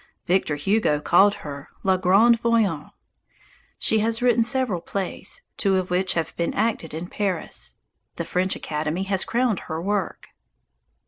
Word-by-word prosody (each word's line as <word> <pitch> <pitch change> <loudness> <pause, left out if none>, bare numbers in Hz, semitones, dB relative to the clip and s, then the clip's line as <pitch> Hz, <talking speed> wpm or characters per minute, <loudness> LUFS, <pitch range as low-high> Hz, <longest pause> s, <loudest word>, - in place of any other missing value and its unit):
Victor 180 -4 +1
Hugo 150 0 +1
called 195 +6 +4
her 140 -1 -7
"La 190 -1 +3
Grande 200 +6 +4
Voyante." 220 -10 +1 0.9
She 220 - +2
has 225 +1 0
written 245 -1 +3
several 235 -6 +1
plays, 195 - -4
two 195 -2 +2
of 185 -1 -1
which 185 +1 +1
have 165 -1 -2
been 170 - -2
acted 210 -7 -1
in 165 +2 -4
Paris. 190 -1 -3 0.4
The - - -4
French 185 +1 0
Academy 155 +4 -3
has 195 -1 0
crowned 235 -4 0
her 160 - -5
work. 200 +2 -2
190 Hz, 145 wpm, -24 LUFS, 170-220 Hz, 0.9 s, called